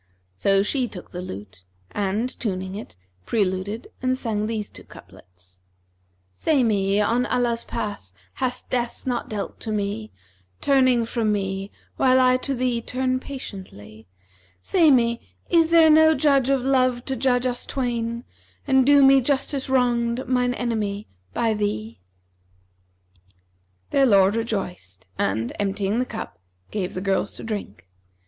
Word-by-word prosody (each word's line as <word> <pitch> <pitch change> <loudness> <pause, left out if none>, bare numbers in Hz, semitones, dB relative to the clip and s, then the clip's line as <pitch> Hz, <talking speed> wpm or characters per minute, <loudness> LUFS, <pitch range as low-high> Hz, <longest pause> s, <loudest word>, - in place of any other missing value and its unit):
So 195 - +3
she 255 +3 0
took 185 -5 -11
the 180 - -5
lute; 95 - -9 0.3
and, 205 +4 -1
tuning 190 -4 -3
it, 210 - -8 0.3
preluded 200 +1 -1
and 255 0 +1
sang 215 -4 -2
these 215 -2 -3
two - - -12
couplets, 90 0 -15 0.7
'Say 275 - +2
me, 200 -3 +2
on 235 +4 +1
Allah's 235 -1 0
path[FN#351] 205 - -5 0.2
hast 255 -1 -3
death 240 -1 -2
not 245 -2 -2
dealt 210 -2 -5
to 220 - -4
me, 200 - -2 0.3
* 95 0 -39
Turning 255 -4 +3
from 225 -2 0
me 195 -1 -2 0.3
while 260 0 +4
I 255 0 +5
to 275 +1 -3
thee 245 -2 0
turn 255 +2 -1
patiently: 185 - -9 0.6
Say 335 -4 +4
me, 235 -3 +3 0.3
is 330 -2 +4
there 330 -2 +6
no 315 +1 +6
judge 275 -2 +3
of 270 -2 +1
Love 255 -2 +2
to 265 - -2
judge 250 0 +1
us 245 -1 -2
twain, 235 -2 -2 0.2
* - - -33
And 265 -1 +5
do 285 -1 +7
me 270 0 +7
justice 275 +1 -1
wronged, 245 -1 +1
mine 250 -1 +1
enemy, 215 -4 -2 0.3
by 225 -1 +2
thee?' 115 - -3 1.9
Their 275 -1 +4
lord 195 -3 +5
rejoiced 180 - -4
and, 110 +4 -1
emptying 200 +2 0
the 255 - +1
cup, 220 - -7 0.3
gave 190 -4 -3
the 185 - -3
girls 195 -1 0
to - - -8
drink. 205 - -6
230 Hz, 145 wpm, -23 LUFS, 195-255 Hz, 1.9 s, do